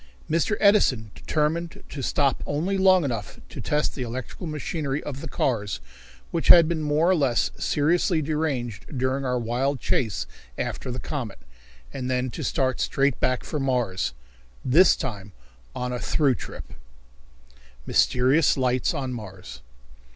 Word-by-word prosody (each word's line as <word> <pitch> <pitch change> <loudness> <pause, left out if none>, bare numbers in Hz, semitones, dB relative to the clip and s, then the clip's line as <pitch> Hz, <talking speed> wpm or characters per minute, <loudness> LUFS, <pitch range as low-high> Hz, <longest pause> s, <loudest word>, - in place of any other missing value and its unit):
Mr. 170 +7 +1
Edison 135 - +3
determined 165 +2 -2
to 140 - -6
stop 140 +1 +1
only 165 +7 -1
long 190 -2 +5
enough 115 -8 -4
to - - -7
test 150 0 0
the 135 - -6
electrical 125 +7 -5
machinery 150 -2 -3
of 140 -2 -6
the - - -6
cars, 105 - -1 0.5
which 165 - -1
had 170 -2 +9
been 165 -1 -1
more 150 +2 +2
or - - +4
less 125 - +1
seriously 165 +3 +2
deranged 140 -5 -2
during 130 +2 0
our 125 -1 0
wild 125 +4 -1
chase 110 -3 0 0.3
after - - -3
the 125 - -4
comet, 125 -6 -5 0.6
and 130 -1 -4
then 125 0 0
to - - -6
start 130 -2 0
straight 135 -1 +1
back 130 -1 +1
for 150 - -3
Mars 125 - 0 0.5
this 165 +9 +6
time 105 - -6 0.4
on 125 0 -3
a 125 - -3
through 140 0 +2
trip. - - -8 1.1
Mysterious 135 +5 +3
Lights 130 +3 +1
on 130 -3 -3
Mars. 95 - -9
135 Hz, 145 wpm, -25 LUFS, 125-155 Hz, 1.1 s, had